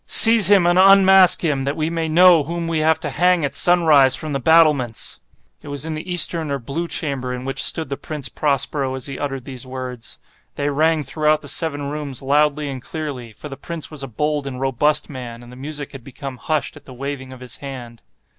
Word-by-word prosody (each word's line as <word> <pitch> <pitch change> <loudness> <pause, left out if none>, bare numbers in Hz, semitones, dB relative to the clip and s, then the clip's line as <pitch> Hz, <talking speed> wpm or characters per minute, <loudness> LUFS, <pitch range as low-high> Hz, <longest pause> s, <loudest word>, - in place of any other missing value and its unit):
Seize 225 -4 +8
him 200 -4 +5
and 175 +1 +3
unmask 190 -1 +6
him—that 140 -3 -1
we 155 +1 -2
may 165 -1 -3
know 175 0 +5
whom 170 +3 -5
we 165 -1 -1
have 160 +1 +2
to 150 - -4
hang 175 +1 +2
at 140 - -4
sunrise, 150 -5 +4
from 155 0 -5
the 140 - -2
battlements!" 150 -5 +2 0.4
It - - -14
was 145 0 -4
in 160 - -4
the 155 +4 -7
eastern 165 -2 +2
or 140 - -2
blue 140 +7 -5
chamber 135 -6 -3
in 125 0 -6
which 135 - -2
stood 160 -4 +2
the 140 - -4
Prince 150 -4 -6
Prospero 140 0 -1
as 130 - -6
he 135 -2 -7
uttered 135 -3 -5
these 130 -2 -8
words. 125 -2 -8 0.4
They 145 0 -2
rang 155 +2 +1
throughout 155 +2 0
the - - -10
seven 145 -4 -3
rooms 145 -4 -5
loudly 150 +1 +1
and 135 -2 -6
clearly—for 140 -5 -7
the 135 -2 -9
prince 165 +2 -5
was 150 -2 -9
a 135 - -6
bold 150 +3 -3
and 130 -2 -7
robust 140 +3 0
man, 120 -4 -9
and 120 - -14
the - - -12
music 145 +2 -7
had 135 -3 -11
become 135 +1 -9
hushed 155 +5 -3
at - - -15
the 130 - -12
waving 135 0 -6
of 130 - -12
his 125 -3 -8
hand. 125 -4 -10
145 Hz, 215 wpm, -19 LUFS, 130-160 Hz, 0.4 s, Seize